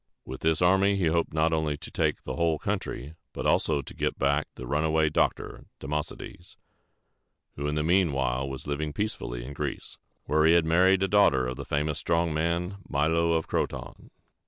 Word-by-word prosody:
With 65 Hz, 0 st, -8 dB
this 80 Hz, +2 st, +2 dB
army 95 Hz, +2 st, +4 dB
he 95 Hz, -3 st, 0 dB
hoped 85 Hz, 0 st, 0 dB
not 80 Hz, +1 st, +1 dB
only 80 Hz, -2 st, 0 dB
to -, -, -11 dB
take -, -, 0 dB
the -, -, -5 dB
whole 85 Hz, -2 st, +1 dB
country, 70 Hz, 0 st, -4 dB, 0.2 s
but -, -, -5 dB
also 75 Hz, -3 st, +2 dB
to -, -, -10 dB
get -, -, -2 dB
back 70 Hz, +2 st, +1 dB
the 65 Hz, -, -8 dB
runaway 80 Hz, +3 st, +1 dB
doctor, 75 Hz, -, -1 dB
Democedes, 75 Hz, +4 st, -6 dB, 1.0 s
who 70 Hz, +1 st, -3 dB
in 75 Hz, -, -1 dB
the 75 Hz, -, 0 dB
mean 90 Hz, 0 st, +3 dB
while 65 Hz, 0 st, -1 dB
was 65 Hz, -1 st, -7 dB
living 75 Hz, +1 st, -3 dB
peacefully -, -, -4 dB
in 70 Hz, -, -7 dB
Greece, -, -, -5 dB, 0.3 s
where 75 Hz, +2 st, +2 dB
he 80 Hz, +1 st, +6 dB
had 85 Hz, -2 st, +4 dB
married 95 Hz, +4 st, +4 dB
a -, -, +2 dB
daughter 95 Hz, -11 st, +4 dB
of 65 Hz, 0 st, -3 dB
the -, -, -7 dB
famous 75 Hz, +1 st, -1 dB
strong 85 Hz, -1 st, 0 dB
man, 85 Hz, +4 st, -1 dB
Milo 80 Hz, +3 st, +2 dB
of 80 Hz, -1 st, 0 dB
Croton. -, -, -4 dB
80 Hz, 185 wpm, -27 LUFS, 70-85 Hz, 1.0 s, he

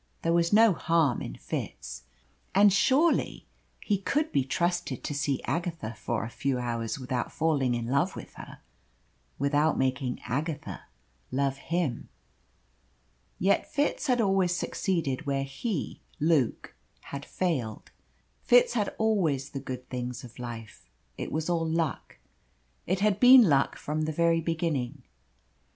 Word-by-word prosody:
There 165 Hz, -, +2 dB
was 170 Hz, 0 st, +2 dB
no 220 Hz, 0 st, +6 dB
harm 165 Hz, -6 st, +1 dB
in -, -, -6 dB
Fitz, -, -, -6 dB, 0.5 s
and 200 Hz, 0 st, +6 dB
surely 280 Hz, -, +2 dB, 0.3 s
he 205 Hz, -3 st, 0 dB
could 295 Hz, +10 st, 0 dB
be 135 Hz, -, +2 dB
trusted 170 Hz, -1 st, -1 dB
to -, -, -3 dB
see 140 Hz, -2 st, -1 dB
Agatha 165 Hz, -6 st, -3 dB
for 115 Hz, 0 st, -3 dB
a 110 Hz, -, -5 dB
few 135 Hz, +1 st, -1 dB
hours 115 Hz, -1 st, -2 dB
without 125 Hz, -2 st, -3 dB
falling 140 Hz, -6 st, +1 dB
in 120 Hz, -1 st, -3 dB
love 140 Hz, +9 st, +1 dB
with -, -, -9 dB
her, -, -, -11 dB, 0.8 s
without 145 Hz, +3 st, +2 dB
making 130 Hz, -1 st, -1 dB
Agatha 150 Hz, +4 st, -4 dB, 0.5 s
love 135 Hz, +1 st, 0 dB
him. 160 Hz, -4 st, -2 dB, 1.3 s
Yet 195 Hz, +3 st, +1 dB
Fitz 290 Hz, +1 st, 0 dB
had 250 Hz, -2 st, +2 dB
always 195 Hz, -4 st, +2 dB
succeeded 165 Hz, -6 st, -2 dB
where 135 Hz, -1 st, 0 dB
he, 145 Hz, -, -4 dB, 0.2 s
Luke, 150 Hz, -6 st, +1 dB, 0.4 s
had 140 Hz, 0 st, -5 dB
failed. 140 Hz, -14 st, -3 dB, 0.5 s
Fitz -, -, +5 dB
had 210 Hz, -4 st, -1 dB
always 170 Hz, -12 st, +1 dB
the 135 Hz, -, -4 dB
good 130 Hz, -2 st, -7 dB
things 125 Hz, -1 st, -4 dB
of 120 Hz, 0 st, -12 dB
life. 115 Hz, -, -8 dB, 0.3 s
It -, -, -5 dB
was 155 Hz, +1 st, -2 dB
all 165 Hz, -2 st, 0 dB
luck. 160 Hz, -4 st, -2 dB, 0.7 s
It 185 Hz, +2 st, 0 dB
had 210 Hz, -1 st, +2 dB
been 250 Hz, 0 st, +9 dB
luck 140 Hz, -8 st, +3 dB
from 155 Hz, +1 st, -2 dB
the 155 Hz, -, -1 dB
very 165 Hz, +1 st, +2 dB
beginning. 150 Hz, -5 st, -2 dB
155 Hz, 140 wpm, -28 LUFS, 130-180 Hz, 1.3 s, been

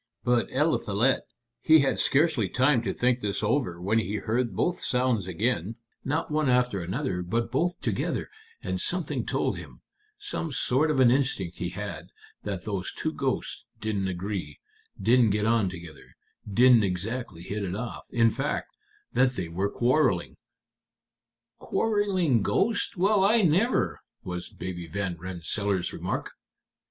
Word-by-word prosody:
But 120 Hz, -1 st, +2 dB
Eliphalet, 130 Hz, -4 st, +2 dB, 0.4 s
he 160 Hz, -1 st, +6 dB
had 135 Hz, -1 st, +1 dB
scarcely 140 Hz, -, +2 dB
time 130 Hz, +3 st, +3 dB
to 105 Hz, -5 st, -2 dB
think 125 Hz, 0 st, +1 dB
this 105 Hz, -2 st, -2 dB
out 105 Hz, -7 st, 0 dB
when 110 Hz, +4 st, +2 dB
he 105 Hz, -1 st, -2 dB
heard 115 Hz, 0 st, -1 dB
both 175 Hz, -, 0 dB
sounds 125 Hz, -6 st, +1 dB
again, 105 Hz, +2 st, -1 dB, 0.3 s
not 150 Hz, +3 st, -1 dB
one 150 Hz, -2 st, +1 dB
after 125 Hz, -6 st, +2 dB
another, 90 Hz, +1 st, -2 dB
but 115 Hz, +7 st, -2 dB
both 175 Hz, +2 st, 0 dB
together, -, -, -1 dB, 0.4 s
and -, -, -2 dB
something -, -, -2 dB
told -, -, 0 dB
him -, -, -12 dB, 0.4 s
some 405 Hz, -, -4 dB
sort 140 Hz, +3 st, +2 dB
of 150 Hz, -3 st, +1 dB
an 125 Hz, -2 st, +6 dB
instinct 125 Hz, -10 st, 0 dB
he 90 Hz, -, -3 dB
had 90 Hz, -4 st, -6 dB, 0.3 s
that 100 Hz, -3 st, -5 dB
those 100 Hz, -4 st, -3 dB
two -, -, -3 dB
ghosts -, -, -2 dB, 0.2 s
didn't 105 Hz, -3 st, -1 dB
agree, 90 Hz, -5 st, -4 dB, 0.4 s
didn't 115 Hz, +3 st, +4 dB
get 105 Hz, +1 st, +1 dB
on 110 Hz, -4 st, +2 dB
together, 85 Hz, -4 st, -11 dB, 0.4 s
didn't 120 Hz, +2 st, +6 dB
exactly 100 Hz, 0 st, -3 dB
hit 100 Hz, +3 st, -4 dB
it 95 Hz, -1 st, -3 dB
off; 120 Hz, +2 st, -5 dB
in 115 Hz, -1 st, +3 dB
fact, 140 Hz, +5 st, -3 dB, 0.4 s
that 125 Hz, 0 st, +3 dB
they 90 Hz, -8 st, -4 dB
were 95 Hz, +4 st, -1 dB
quarreling." 120 Hz, -, +1 dB, 1.2 s
"Quarreling 195 Hz, -, +1 dB
ghosts! 205 Hz, -, 0 dB
Well, 195 Hz, +2 st, +3 dB
I 215 Hz, +2 st, +4 dB
never!" 190 Hz, +9 st, +2 dB, 0.2 s
was 90 Hz, -1 st, -5 dB
Baby 90 Hz, -2 st, -6 dB
Van 95 Hz, +1 st, -3 dB
Rensselaer's 95 Hz, +2 st, -2 dB
remark. -, -, -3 dB
115 Hz, 145 wpm, -27 LUFS, 95-135 Hz, 1.2 s, he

